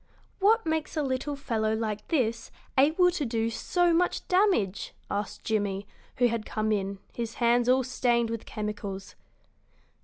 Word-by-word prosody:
"What 435 +2 +4
makes 315 -1 -1
a 305 - +2
little 270 +2 -2
fellow 220 -6 -1
like 215 -2 -3
this 235 -8 0 0.3
able 315 +7 +5
to 340 -4 -2
do 230 -2 0
so 350 +8 +1
much 355 +2 +1
damage?" 360 - +2 0.2
asked 205 0 -3
Jimmie, 205 -2 -1 0.3
who 245 - +3
had 230 -2 -2
come 215 0 -1
in, 200 -1 -1 0.2
his 230 -1 -4
hands 240 0 +3
all 260 +1 +4
stained 240 -2 +1
with 230 -1 -5
chemicals. 205 -2 -5
235 Hz, 150 wpm, -28 LUFS, 215-290 Hz, 0.3 s, able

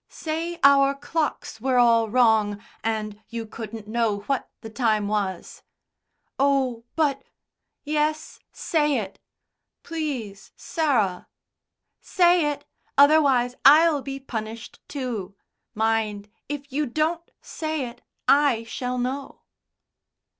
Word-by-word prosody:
"Say 330 +2 -4
our 275 0 +6
clocks 290 -5 -3
were 260 0 +1
all 230 -2 +4
wrong, 220 -3 +3 0.2
and 215 -2 -3
you 230 -1 -5
couldn't 220 -1 -8
know 220 -2 0
what 270 +5 -2
the 225 - -8
time 215 -4 +1
was." 200 -4 -3 0.8
"Oh, 265 -4 +1
but 295 -4 +1 0.4
" - - -59 0.2
"Yes, 305 +1 -1
say 295 -4 0
it." 200 -4 -5 0.6
"Please, 270 - -5
Sarah." 240 - 0 0.7
"Say 350 -4 +3
it. 285 0 -8 0.3
Otherwise 280 -4 +5
I'll 305 +1 +6
be 275 0 -6
punished 225 -4 -7
too. 230 -9 -5 0.4
Mind, 215 -2 -1 0.2
if 285 -2 -6
you 295 +1 0
don't 320 +6 -1
say 310 -4 -4
it, 240 +1 -12 0.3
I 280 -5 +4
shall 250 +2 -4
know." 260 +3 -4
255 Hz, 110 wpm, -24 LUFS, 220-295 Hz, 0.8 s, our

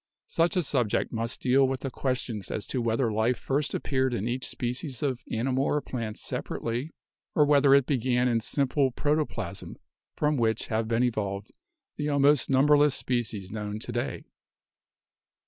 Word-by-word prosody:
Such 170 +3 +1
a 180 - +2
subject 125 -7 0
must 115 +1 -3
deal 135 +1 +4
with 130 0 -3
the 135 - -3
questions 125 -6 -3
as 105 - -3
to 130 - -1
whether 115 +1 +1
life 110 +3 +1
first 140 +5 -1
appeared 130 -2 0
in 105 +1 -2
each 125 +2 -2
species 125 +2 -4
of 130 -3 -1
animal 130 +4 0
or 150 - +1
plant 115 -6 -5
separately, 120 +6 -3 0.5
or 150 - +5
whether 140 -1 +5
it 140 -2 +4
began 125 -2 +1
in 120 -2 +2
simple 135 +3 +1
proto 150 +4 +1
plasm - - -6 0.4
from 150 -1 +1
which 110 -2 0
have 110 0 0
been 115 +2 +2
evolved 105 -4 -2 0.5
the 150 0 -1
almost 145 -1 +4
number 140 +3 +5
less 145 -1 +4
species 110 -6 -2
known 105 -1 -4
to 115 - -6
day. 120 +1 -3
125 Hz, 165 wpm, -27 LUFS, 115-140 Hz, 0.5 s, or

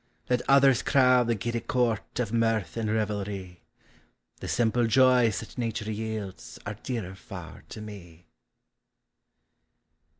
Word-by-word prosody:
Let 125 - +3
others 135 -2 +6
crowd 125 -3 +4
the 115 - +2
giddy 115 +3 -2
court 120 -4 -1
Of 115 -3 -1
mirth 115 -4 +1
and 115 -2 -1
revel 105 -2 0
rv, 95 -3 -7 0.8
The - - -6
simple 120 0 +2
joys 125 -2 +4
that 110 +3 -10
nature 115 -2 -2
yields 110 -3 -5
Are 100 - -3
dearer 110 -4 -5
far 95 -5 -10
to 110 - -8
me. 90 -5 -11
110 Hz, 130 wpm, -27 LUFS, 105-120 Hz, 0.8 s, others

